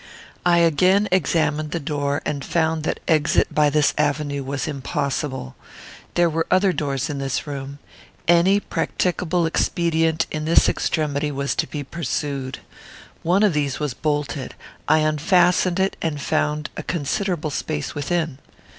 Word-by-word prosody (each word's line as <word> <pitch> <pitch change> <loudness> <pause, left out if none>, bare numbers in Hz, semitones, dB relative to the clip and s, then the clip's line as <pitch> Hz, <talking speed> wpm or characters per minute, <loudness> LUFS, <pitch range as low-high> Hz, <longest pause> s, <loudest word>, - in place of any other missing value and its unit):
I 175 -1 +5
again 185 +5 +4
examined 155 -3 +1
the 170 - -2
door, 145 -1 -2
and 140 -2 -2
found 160 -1 0
that - - -1
exit 155 -2 +2
by 150 -1 +4
this 150 -1 +2
avenue 145 -1 0
was 135 +1 -3
impossible. 140 - -3 0.6
There 175 0 +4
were 165 0 -1
other 185 0 +3
doors 140 -5 -1
in 145 -2 -4
this 135 -2 -2
room. 140 -1 -6 0.5
Any 175 +4 +5
practicable 180 -3 -1
expedient 165 -1 +1
in 155 0 -3
this 165 - +5
extremity 150 -2 0
was 140 0 -1
to - - -1
be 145 -2 -5
pursued. 140 -3 -3 0.6
One 180 +5 +2
of 205 -5 +4
these 145 -3 -1
was 150 -4 -2
bolted. 145 -2 -2 0.3
I 155 +1 +4
unfastened 180 +3 +3
it 190 +1 +1
and 155 -3 -2
found 150 +1 -1
a - - -4
considerable 165 +1 -2
space 150 +1 -3
within. 155 -1 -2
155 Hz, 145 wpm, -22 LUFS, 145-170 Hz, 0.6 s, I